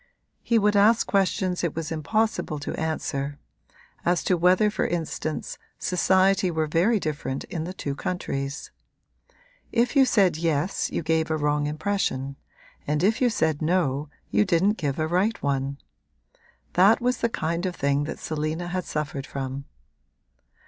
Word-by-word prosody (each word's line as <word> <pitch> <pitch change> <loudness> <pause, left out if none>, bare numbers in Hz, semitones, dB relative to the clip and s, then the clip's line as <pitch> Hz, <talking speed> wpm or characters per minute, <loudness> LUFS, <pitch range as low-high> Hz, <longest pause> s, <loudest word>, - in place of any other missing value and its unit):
He 235 - +2
would 210 -1 +3
ask 215 +3 +5
questions 185 -2 +1
it 170 - -1
was 165 -1 -4
impossible 215 +1 0
to 145 - -5
answer; 145 -3 -3 0.7
as 175 0 +1
to 185 - +2
whether 180 +5 +4
for - - 0
instance 160 -2 -3 0.2
society 190 +1 +3
were 160 -2 0
very 175 +9 +2
different 150 -5 -3
in 160 -2 -5
the 180 - -5
two 140 - -3
countries. 140 -3 -4 1.0
If 240 +5 +1
you 270 -1 +7
said 195 -9 +3
yes 165 +2 0
you - - -2
gave 160 0 +1
a 160 - +1
wrong 145 0 +1
impression 150 -4 -1 0.5
and 150 +2 0
if 215 +6 +2
you 250 - +4
said 160 -9 0
no 155 -4 0 0.2
you - - +4
didn't 195 +3 +2
give 145 -4 -1
a 155 - 0
right 185 +7 +1
one: 140 0 -1 1.0
that 195 +5 +5
was 250 +1 +1
the 235 - 0
kind 170 -2 -2
of 180 - -4
thing 140 +1 +1
that 155 - -5
Selina 155 +3 -3
had 185 0 -2
suffered 145 -2 -4
from. 135 0 -5
165 Hz, 155 wpm, -25 LUFS, 150-195 Hz, 1.0 s, you